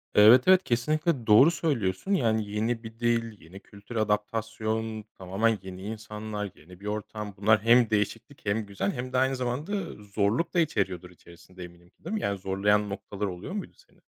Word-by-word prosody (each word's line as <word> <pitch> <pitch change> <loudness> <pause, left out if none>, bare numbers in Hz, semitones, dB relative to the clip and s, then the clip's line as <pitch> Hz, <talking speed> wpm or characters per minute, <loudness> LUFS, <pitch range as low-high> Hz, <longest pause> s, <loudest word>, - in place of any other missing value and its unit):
Evet, 115 +5 +8
evet, 185 0 +6
kesinlikle 145 +1 0
doğru 120 +10 +7
söylüyorsun, 120 - -1
yani 110 - +1
yeni 115 +3 -1
bir 115 +1 -10
dil, 115 -2 0
yeni 90 +4 -12
kültür, 100 +4 -13
adaptasyon, 110 +1 -1
tamamen 100 +4 0
yeni 95 -1 -9
insanlar, 105 -1 -5
yeni 90 +4 -16
bir 100 - -12
ortam. 105 0 -5
Bunlar 105 +1 +4
hem 120 0 +5
değişiklik, 110 +6 -2
hem 105 +1 0
güzel 100 0 -2
hem 125 +1 -5
de - - +2
aynı 130 +1 +2
zamanda 130 +9 -3 0.3
zorluk 105 - 0
da 175 - +2
içeriyordur 95 - -1
içerisinde, 90 +1 -14
eminim 85 0 -14
ki, - - -36
değil - - -5
mi? 215 - -1
Yani 100 -1 -1
zorlayan 100 +2 +1
noktalar 100 0 -5
oluyor 90 - -6
muydu 205 - -5 0.2
seni? - - -27
110 Hz, 175 wpm, -27 LUFS, 100-120 Hz, 0.3 s, Evet